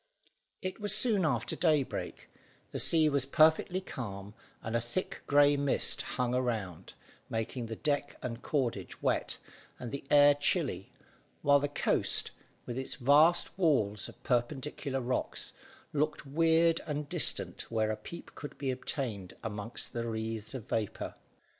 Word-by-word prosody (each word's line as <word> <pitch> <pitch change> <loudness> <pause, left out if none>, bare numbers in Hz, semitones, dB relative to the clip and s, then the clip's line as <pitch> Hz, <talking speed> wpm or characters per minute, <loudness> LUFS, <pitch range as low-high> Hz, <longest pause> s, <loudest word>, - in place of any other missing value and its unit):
It 185 +3 -4
was 205 0 0
soon 215 -5 +2
after 120 -6 0
daybreak, 155 -6 0 0.4
the - - -3
sea 160 -2 +5
was 140 -3 +2
perfectly 160 +5 +4
calm 100 - -7 0.3
and 110 +1 -3
a 115 - +2
thick 120 +11 -3
grey 145 0 +5
mist 140 -1 +2 0.2
hung 125 -1 +1
around, 110 -9 -2 0.4
making 115 +2 -3
the 110 - -5
deck 145 +2 -1
and 120 -1 -4
cordage 120 - -2
wet - - 0 0.4
and 120 -2 -6
the 140 - -5
air 145 0 +7
chilly, 145 0 0 0.5
while 145 0 +6
the 145 - 0
coast, 145 - +2 0.3
with 120 +1 -4
its 130 - -3
vast 150 +7 +4
walls 110 - +2
of - - -16
perpendicular 135 +2 -1
rocks, 125 +1 -2 0.4
looked 150 0 0
weird 165 +3 +3
and 150 -1 -3
distant - - 0
where 110 -1 +1
a - - -1
peep 170 +11 -10
could 145 - -8
be 135 -2 -1
obtained 125 - -4
amongst 105 +1 -4
the 115 0 -2
wreaths 110 +1 -4
of 120 -5 -7
vapour. 110 -3 -2
135 Hz, 145 wpm, -31 LUFS, 115-150 Hz, 0.5 s, air